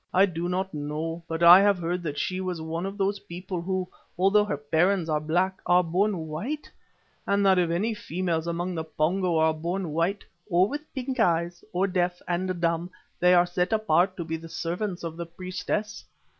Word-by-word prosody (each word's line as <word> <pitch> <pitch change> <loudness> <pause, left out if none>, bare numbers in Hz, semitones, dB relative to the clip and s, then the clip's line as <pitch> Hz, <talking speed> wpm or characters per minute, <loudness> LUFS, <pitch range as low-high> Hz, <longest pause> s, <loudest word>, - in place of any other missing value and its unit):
"I 190 +2 +7
do 175 -2 -3
not 190 +1 -2
know, 155 +3 -4
but 165 0 -2
I 175 +3 +10
heave 200 -1 +4
heard 175 +1 -2
that 150 -4 -4
she 185 +4 -2
was 180 -2 -3
one 165 +3 -3
of 195 +1 -7
those 200 0 0
people 180 0 -6
who, 185 +1 -2 0.3
although 195 +3 +4
their 150 - -2
parents 160 +4 +1
are 150 - +2
black, 180 +5 0
are 180 +1 +5
born 180 0 0
white, 235 - -5 0.6
and 200 0 +2
that 190 -1 +5
if 175 -2 +2
any 200 +7 0
females 170 -4 -2
among 175 +2 -2
the 160 -2 -3
Pongo 170 +3 0
are 160 0 +3
born 170 +2 -3
white, 170 +6 -1 0.2
or 180 +1 +4
with 295 +5 -6
pink 260 0 -3
eyes, 175 -3 +1
or 180 +2 +1
deaf 180 -2 0
and 180 0 -1
dumb, 170 +1 0 0.3
they 180 0 +5
are 175 0 +5
set 180 +2 -1
apart 190 -4 +2
to 170 - -4
be 160 0 -3
the 165 +1 -11
servants 175 +3 -3
of 165 -1 -5
the 170 - -4
priestess. 185 +4 -4
180 Hz, 200 wpm, -26 LUFS, 165-190 Hz, 0.6 s, I